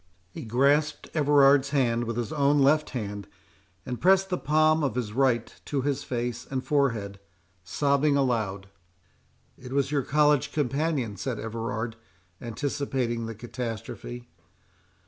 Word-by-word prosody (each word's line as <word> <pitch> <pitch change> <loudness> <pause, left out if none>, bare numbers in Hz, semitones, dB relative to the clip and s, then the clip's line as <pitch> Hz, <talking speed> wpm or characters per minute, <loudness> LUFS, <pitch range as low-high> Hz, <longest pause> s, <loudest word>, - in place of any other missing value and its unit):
He - - -8
grasped 140 +6 +1
Everard's 140 -2 +4
hand 120 -4 +1
with 115 0 -4
his 120 +5 -3
own 145 -1 +3
left 145 +2 +3
hand, 105 -5 -5 0.6
and 125 - -5
pressed 190 +1 +4
the 180 - +1
palm 155 +1 +3
of 135 -5 -1
his 115 -4 -3
right 125 -2 +1
to 140 -3 -2
his 140 -1 -1
face 120 -1 -3
and 130 -1 -2
forehead, 115 -9 0 0.4
sobbing 140 - +1
aloud. 110 -8 -1 0.9
"It 125 0 -9
was 140 0 +1
your 145 -2 +2
college 145 +1 +2
companion?" 140 -6 -1
said 125 +3 -3
Everard, 115 0 -4 0.4
anticipating 120 -1 -2
the 115 - -6
catastrophe. 110 - -6
130 Hz, 130 wpm, -27 LUFS, 115-145 Hz, 0.9 s, Everard's